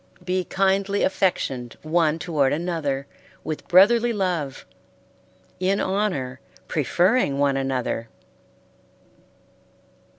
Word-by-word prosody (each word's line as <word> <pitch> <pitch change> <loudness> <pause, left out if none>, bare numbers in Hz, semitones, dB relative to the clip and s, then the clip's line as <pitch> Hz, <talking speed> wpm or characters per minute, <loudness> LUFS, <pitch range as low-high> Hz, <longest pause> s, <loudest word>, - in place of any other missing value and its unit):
Be 185 0 -1
kindly 195 +1 +1
affectioned 135 -11 -1
one 160 0 +2
toward 155 -5 +1
another 150 -4 -2 0.4
with 155 -1 -5
brotherly 230 +6 +5
love, 175 - -2 0.9
in 190 +2 +1
honor 180 -11 -1 0.3
preferring 175 - +1
one 140 -1 +2
another. 130 -4 -2
170 Hz, 80 wpm, -23 LUFS, 140-190 Hz, 0.9 s, brotherly